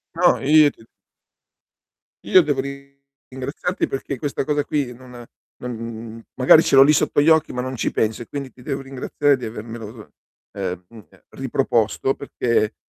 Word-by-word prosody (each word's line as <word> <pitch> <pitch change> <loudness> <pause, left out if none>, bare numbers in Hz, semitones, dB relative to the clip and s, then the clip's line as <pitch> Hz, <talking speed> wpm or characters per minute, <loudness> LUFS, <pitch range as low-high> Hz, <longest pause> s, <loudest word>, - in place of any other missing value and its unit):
No, 175 +2 +3
io 150 +1 +6
ti - - -20 1.4
Io 185 - +6
devo 145 -4 -1 0.7
ringraziarti, 140 +8 -3
perché 135 0 -4
questa 145 +1 -2
cosa 145 +1 -1
qui, 140 -5 -2
non 125 -1 -12 0.4
non 125 - -4
mh 120 - -6
mh 115 0 -7
mhmm, 115 - -11
magari 130 +4 +6
ce - - +2
l'ho 135 - +9
lì 150 +2 +5
sotto 150 -1 +1
gli 145 - +1
occhi 160 -1 +3
ma 125 - -5
non 130 +1 -5
ci 115 - -1
penso 110 +1 -1
e 120 - -8
quindi 140 -2 -5
ti 125 - -19
devo 135 +1 -4
ringraziare 135 +2 0
di 125 - -10
avermelo 110 0 -7
s 110 -2 -13 0.5
ehm, 90 -2 -4
mhmm, 110 -2 -15
ehm, - - -23
riproposto 115 +4 0
perché 115 -5 -1
130 Hz, 180 wpm, -21 LUFS, 115-145 Hz, 1.4 s, l'ho